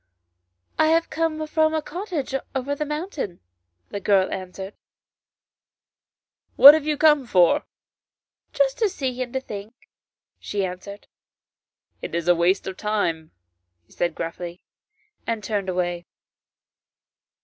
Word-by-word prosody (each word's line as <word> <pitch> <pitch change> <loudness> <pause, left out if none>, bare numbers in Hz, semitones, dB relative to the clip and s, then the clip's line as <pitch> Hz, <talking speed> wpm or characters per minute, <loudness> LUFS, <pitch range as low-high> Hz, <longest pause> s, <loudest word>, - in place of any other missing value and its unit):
" - - -52 0.3
I 315 - +5
have 330 +1 +2
come 315 -1 -1
from 315 0 +1
a 315 - 0
cottage 335 -6 -5 0.2
over 265 +2 -1
the 300 +1 -3
mountain," 300 - -4 0.5
the 200 - -4
girl 195 -2 +2
answered. 190 +1 -6 0.9
" - - -55
What 285 +2 +11
have 310 -1 -1
you 300 -1 0
come 295 -4 +4
for? 180 -6 +3 0.3
" - - -70
" - - -55
Just - - +1
to 440 -3 +3
see 255 -7 -3
and 245 -1 -3
to 265 - 0
think," 210 -3 -8 0.6
she 200 -2 -2
answered. 190 +3 -8 0.5
" - - -51
It - - -5
is 170 0 -2
waste 175 +3 +2
of 190 - -6
time," 170 -7 -1 0.6
he - - -31
said 175 -2 -2
gruffly, 170 +1 -6 0.6
and 225 -2 -2
turned 200 -1 -2
away. 175 -1 -2
215 Hz, 140 wpm, -23 LUFS, 185-305 Hz, 0.9 s, What